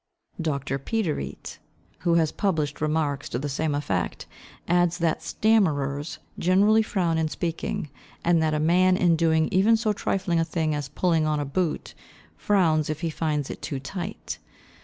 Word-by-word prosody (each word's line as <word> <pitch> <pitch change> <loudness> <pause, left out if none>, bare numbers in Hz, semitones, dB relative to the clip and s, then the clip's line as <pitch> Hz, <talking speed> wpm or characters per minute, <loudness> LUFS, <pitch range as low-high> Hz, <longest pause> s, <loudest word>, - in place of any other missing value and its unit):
Dr. 140 -3 -2
Piderit 185 - -3 0.4
who 170 -2 +2
has 160 -2 +3
published 155 -8 -1
remarks 150 -2 -1
to - - -2
the 140 +4 -3
same 145 +2 -1
effect, 100 -12 -2 0.4
adds 175 -1 +2
that 165 -2 0
stammerers 150 -9 +1 0.2
generally 200 +5 +4
frown 175 -6 0
in 160 - +1
speaking, 160 -2 -3 0.3
and 170 -1 +3
that 155 -1 +1
a - - 0
man 180 +4 +4
in 175 -3 +4
doing 160 -1 +2
even 210 +5 +4
so 220 -1 0
trifling 185 -4 0
a - - +3
thing 160 -2 -1
as 145 -2 -3
pulling 160 +1 +1
on 150 -1 +1
a 145 - -1
boot, 160 +3 -2 0.4
frowns 165 -7 +2
if 155 +1 -3
he 165 -2 -1
finds 150 -3 -1
it - - -9
too 140 -4 -4
tight. 180 +9 -6
160 Hz, 160 wpm, -25 LUFS, 150-180 Hz, 0.4 s, generally